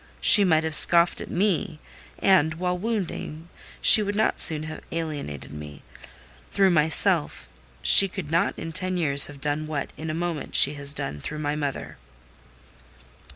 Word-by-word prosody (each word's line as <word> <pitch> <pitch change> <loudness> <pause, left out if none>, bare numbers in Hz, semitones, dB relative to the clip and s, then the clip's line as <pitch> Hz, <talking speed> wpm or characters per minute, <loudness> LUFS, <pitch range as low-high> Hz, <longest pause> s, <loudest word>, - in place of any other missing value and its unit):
She 205 - +5
might 160 -4 +1
have 160 -1 -4
scoffed 170 +3 +3
at - - -9
me, 175 -4 -2 0.4
and, 160 -5 +1
while 180 +2 -3
wounding, 180 -5 -6 0.3
she 215 - +8
would 205 0 -4
not 215 - -1
soon 155 -1 +2
have 155 0 -9
alienated 150 - -7
me: 75 -2 -11 0.7
through 195 -1 +1
myself, 150 - +1 0.4
she 195 - +8
could 175 -5 -8
not 165 +1 -1
in 165 - -8
ten 185 +2 -1
years 140 -5 +2
have 145 -1 -13
done 150 +2 -4
what, 150 -2 -6
in 160 +1 -7
a 155 - -4
moment, 170 -3 -6
she 140 - +4
has 140 0 -3
done 75 - -5
through 155 - -7
my 150 -1 -4
mother." 145 -3 -6
160 Hz, 160 wpm, -23 LUFS, 145-180 Hz, 0.7 s, she